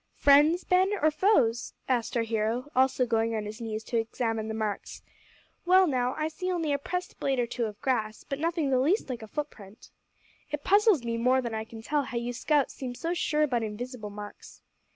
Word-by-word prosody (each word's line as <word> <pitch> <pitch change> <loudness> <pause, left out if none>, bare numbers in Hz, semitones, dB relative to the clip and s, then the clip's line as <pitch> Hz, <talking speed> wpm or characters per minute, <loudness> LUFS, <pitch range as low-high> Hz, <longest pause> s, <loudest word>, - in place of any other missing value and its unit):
"Friends, 295 +5 +5
Ben, 375 +2 +3
or 310 +1 +3
foes?" 245 - +2
asked 245 -2 0
our 230 - +2
hero, 225 +5 -1
also 260 0 +3
going 225 -1 0
on 215 -1 -2
his 215 +3 -7
knees 220 -1 -4
to 235 - -2
examine 225 -1 -2
the 220 - -3
marks. 215 -2 -4 0.6
"Well, 370 +1 +6
now, 255 -5 0
I 310 0 -1
see 365 +4 -4
only 330 -5 0
a 280 - 0
pressed 360 +5 -4
blade 270 -1 0
or 240 - +2
two 235 0 -2
of 210 -1 -7
grass, 220 -5 -1
but 275 - -5
nothing 325 -3 0
the 260 - +3
least 300 - +1
like 245 -2 -5
a 220 - -8
footprint. 215 -7 -7 0.6
It 295 0 -4
puzzles 405 - +4
me 230 0 -1
more 250 +3 +3
than 235 -3 -3
I 220 0 -3
can 225 0 -11
tell 295 +4 +1
how 260 -3 -5
you 240 +1 -2
scouts 290 +3 +1
seem 250 -2 -6
so 335 +6 -2
sure 305 -3 +1
about 250 -6 +1
invisible 220 +1 -5
marks." 205 0 -10
250 Hz, 210 wpm, -28 LUFS, 225-300 Hz, 0.6 s, Well